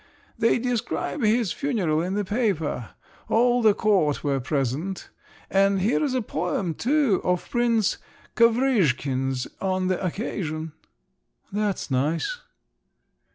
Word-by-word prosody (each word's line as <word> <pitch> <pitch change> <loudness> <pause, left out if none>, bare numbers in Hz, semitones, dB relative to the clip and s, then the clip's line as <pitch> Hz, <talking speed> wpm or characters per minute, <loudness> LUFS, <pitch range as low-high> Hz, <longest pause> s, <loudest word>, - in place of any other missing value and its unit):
They 230 - +3
describe 245 +4 -2
his 220 -3 +2
funeral 195 - 0
in 185 +3 -2
the 205 -1 -1
paper. 185 - -1 0.4
All 245 +2 +3
the 215 -3 +5
court 190 -9 +2
were 140 -2 0
present. 140 +8 -2 0.4
And 195 0 +3
here's 255 +7 +1
a 255 - 0
poem 185 -4 -2
too, 265 - +2
of 180 -1 0
Prince 230 -3 +1 0.4
Kovrizhkin's 145 - +2
on 185 -1 0
the 185 +1 -1
occasion." 165 -4 -3 0.8
"That's 205 -6 -2
nice!" 155 - 0
195 Hz, 110 wpm, -25 LUFS, 155-230 Hz, 0.8 s, the